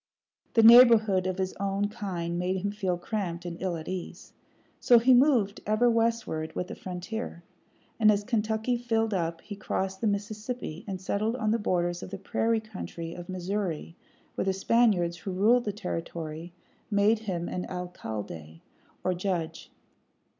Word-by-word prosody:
The 225 - +6
neighborhood 225 -5 +7
of 185 0 -2
his 190 -1 -2
own 200 +1 0
kind 175 -5 -4
made 185 +1 0
him 200 - 0
feel 190 -4 -1
cramped 175 -2 -4
and 170 -1 -6
ill 185 -2 -1
at 160 - -9
ease. 185 +1 -6 0.5
So 240 - +6
he 250 +3 +5
moved 245 -6 +4
ever 225 +3 +3
westward 225 -9 0
with 180 - -3
the - - -6
frontier; 180 0 -6 0.6
and 215 -1 +6
as 205 0 0
Kentucky 220 +1 0
filled 225 -2 0
up 165 -3 -2
he 205 - -8
crossed 190 -1 -3
the 225 - +1
Mississippi 210 -2 -3
and 190 -2 -4
settled 210 +4 -1
on 220 -4 0
the 230 - +1
borders 175 -3 0
of - - -7
the 195 - -6
prairie 225 +4 0
country 185 -6 -7
of 175 0 -9
Missouri, 185 -3 -3 0.4
where - - -2
the 190 - +1
Spaniards, 195 -4 +2
who 180 - -7
ruled 220 +6 +3
the 210 - 0
territory, 165 -4 -5 0.4
made 210 +1 +3
him 180 -6 -3
an 180 - -4
alcalde, 110 - -6 0.4
or 185 - +1
judge. 175 -3 -3
195 Hz, 160 wpm, -28 LUFS, 175-220 Hz, 0.6 s, neighborhood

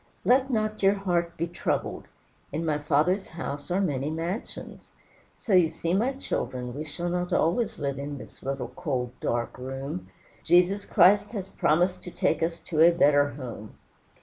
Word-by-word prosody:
'Let 260 +2 +4
not 215 -3 -1
your 195 +1 +5
heart 175 -3 -1
be 170 - 0
troubled; 175 +1 -2 0.5
in 160 +4 -2
my 150 -2 0
Father's 155 +7 +1
house 145 -2 -6
are 180 +2 +1
many 145 -7 0
mansions.' 170 +7 -5 0.5
So 215 - -2
you 180 -3 +6
see, 165 +1 -3
my 235 +8 +2
children, 125 - -4
we 150 +2 -4
shall 165 +3 -3
not 180 0 -2
always 180 +8 +1
live 140 -2 -3
in 140 0 -5
this - - -12
little, 135 -2 -3
cold, 125 -6 -3
dark 120 +1 -2
room. 135 +6 -5 0.3
Jesus 180 +4 +3
Christ 205 +3 +5
has 195 -3 -4
promised 180 +1 +1
to - - -8
take - - 0
us 165 +1 -1
to 160 -3 -3
a 165 - +9
better 145 -4 +4
home." 120 -6 -8
170 Hz, 170 wpm, -27 LUFS, 145-185 Hz, 0.5 s, a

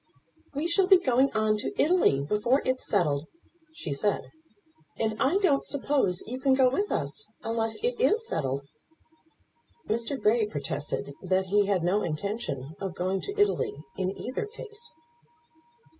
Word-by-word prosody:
"We 300 +4 0
shall 370 +2 +3
be 380 -1 +8
going 265 -5 +2
on 215 -1 +2
to 210 - -4
Italy 315 - +4
before 235 - +2
it's 255 0 0
settled," 155 -7 +1 0.5
she 320 - -4
said; 205 +9 -1 0.7
"and 220 -1 0
I 290 +8 +3
don't 345 -9 +3
suppose 275 -10 0
you 250 +3 -5
can 265 0 +3
go 260 -1 +4
with 405 +10 -1
us, 140 +4 -3 0.2
unless 225 0 -1
it 480 -1 0
is 450 -1 +3
settled." 135 -2 -2 1.2
Mr. 235 +5 -1
Grey 220 0 +3
protested 145 -4 -4
that 190 0 +1
he 205 -1 +4
had 190 -4 +1
no 190 +4 +2
intention 155 - -3
of 190 -2 -4
going 185 +2 -1
to 405 +1 -6
Italy 410 - +2 0.2
in 185 -1 -1
either 255 +10 -4
case. 440 +1 -9
225 Hz, 150 wpm, -28 LUFS, 185-285 Hz, 1.2 s, be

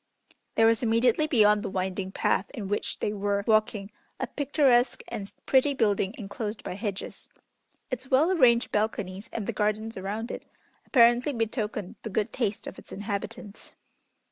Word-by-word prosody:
There 225 - +5
was 225 0 +4
immediately 235 +5 +3
beyond 210 -7 +4
the - - -4
winding 190 0 -2
path 190 - 0
in 210 -6 -5
which 205 +1 -2
they 210 - 0
were 200 0 -1
walking 215 -2 +1 0.3
a - - 0
picturesque 265 -4 +2
and 200 -1 -5
pretty 275 +1 +3
building 205 -3 +1
enclosed 210 0 -5
by - - -4
hedges. 200 0 -5 0.6
Its 255 +1 -4
well 295 +7 +4
arranged 245 -9 +4
balconies 210 -2 -2
and 220 - -4
the - - -2
gardens 215 +1 -1
around 210 +5 -4
it - - -7 0.4
apparently 240 +2 +5
betokened 220 -4 -3
the 220 - -5
good 210 +1 -1
taste 220 -5 -1
of - - -8
its - - -15
inhabitants. 205 +1 -6
215 Hz, 155 wpm, -27 LUFS, 205-240 Hz, 0.6 s, There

